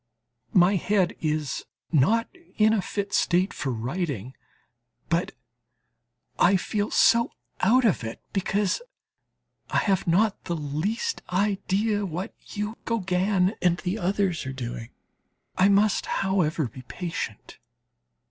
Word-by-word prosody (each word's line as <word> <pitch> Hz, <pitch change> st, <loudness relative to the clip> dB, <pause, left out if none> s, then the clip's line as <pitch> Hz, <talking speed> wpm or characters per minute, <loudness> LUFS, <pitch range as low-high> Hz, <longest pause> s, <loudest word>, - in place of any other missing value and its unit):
My 185 Hz, +2 st, +6 dB
head 190 Hz, 0 st, +1 dB
is 155 Hz, -2 st, -1 dB, 0.3 s
not 205 Hz, -, +3 dB, 0.3 s
in 215 Hz, 0 st, +5 dB
a 215 Hz, -, +2 dB
fit 200 Hz, +2 st, -4 dB
state 180 Hz, +2 st, +2 dB
for 135 Hz, -, -3 dB
writing, 130 Hz, -, -3 dB, 0.8 s
but 170 Hz, +1 st, 0 dB, 1.1 s
I 195 Hz, +1 st, +5 dB
feel 205 Hz, +3 st, -2 dB
so 230 Hz, +1 st, +4 dB, 0.3 s
out 245 Hz, +6 st, +4 dB
of 195 Hz, -, +2 dB
it 115 Hz, 0 st, -5 dB
because 200 Hz, -, 0 dB, 0.9 s
I -, -, 0 dB
have 195 Hz, -4 st, +1 dB
not 200 Hz, +5 st, +2 dB
the 170 Hz, -, -2 dB
least 165 Hz, -, -2 dB
idea 205 Hz, +2 st, +1 dB
what 185 Hz, +1 st, -4 dB, 0.2 s
you, 210 Hz, +2 st, -3 dB
Gauguin 190 Hz, -2 st, +1 dB
and 175 Hz, -1 st, +3 dB
the 185 Hz, +5 st, -3 dB
others 190 Hz, -2 st, 0 dB
are 130 Hz, -, -4 dB
doing. 120 Hz, -2 st, -6 dB, 0.7 s
I 185 Hz, +2 st, +4 dB
must, 200 Hz, +1 st, +3 dB
however, 170 Hz, -7 st, +1 dB
be 125 Hz, +3 st, -11 dB
patient. 165 Hz, -, -6 dB
185 Hz, 120 wpm, -26 LUFS, 160-205 Hz, 1.1 s, My